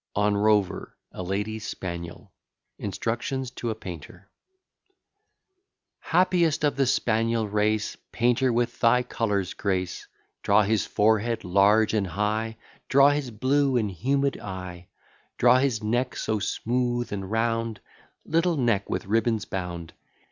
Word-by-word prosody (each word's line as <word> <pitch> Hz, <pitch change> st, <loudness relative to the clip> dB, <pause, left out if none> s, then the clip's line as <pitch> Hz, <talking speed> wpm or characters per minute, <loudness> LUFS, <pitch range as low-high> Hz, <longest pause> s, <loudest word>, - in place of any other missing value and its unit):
ON 105 Hz, 0 st, +2 dB
ROVER, 105 Hz, -2 st, +1 dB
A -, -, -7 dB
LADY'S 105 Hz, +4 st, -3 dB
SPANIEL 85 Hz, -2 st, -6 dB, 0.5 s
INSTRUCTIONS 125 Hz, +3 st, -3 dB
TO 120 Hz, -2 st, -4 dB
A 110 Hz, -, -2 dB
PAINTER 90 Hz, 0 st, -10 dB, 1.7 s
Happiest 170 Hz, -3 st, +2 dB
of 145 Hz, -2 st, +2 dB
the 135 Hz, -1 st, +1 dB
spaniel 115 Hz, -2 st, +1 dB
race, 105 Hz, +1 st, 0 dB, 0.2 s
Painter, 125 Hz, +2 st, +2 dB
with 120 Hz, 0 st, -1 dB
thy 125 Hz, +1 st, +4 dB
colours 105 Hz, -6 st, -1 dB
grace: 95 Hz, -3 st, -2 dB, 0.3 s
Draw 100 Hz, +1 st, +4 dB
his 105 Hz, +1 st, 0 dB
forehead 110 Hz, +2 st, +1 dB
large 100 Hz, +4 st, +3 dB
and 105 Hz, -3 st, +1 dB
high, 110 Hz, +5 st, -2 dB, 0.3 s
Draw 140 Hz, +1 st, +6 dB
his 145 Hz, -3 st, -2 dB
blue 130 Hz, +4 st, +1 dB
and 105 Hz, -4 st, 0 dB
humid 135 Hz, -, 0 dB
eye; 90 Hz, -2 st, -7 dB, 0.5 s
Draw 125 Hz, +1 st, +5 dB
his 125 Hz, -5 st, 0 dB
neck 120 Hz, +4 st, 0 dB
so 110 Hz, -, -1 dB
smooth 120 Hz, +3 st, -1 dB
and 95 Hz, -2 st, -5 dB
round, 115 Hz, -1 st, -1 dB, 0.5 s
Little 165 Hz, +1 st, +1 dB
neck 115 Hz, -6 st, +1 dB
with -, -, -2 dB
ribbons 110 Hz, +1 st, +1 dB
bound! 85 Hz, -3 st, -5 dB
110 Hz, 125 wpm, -26 LUFS, 100-125 Hz, 1.7 s, Draw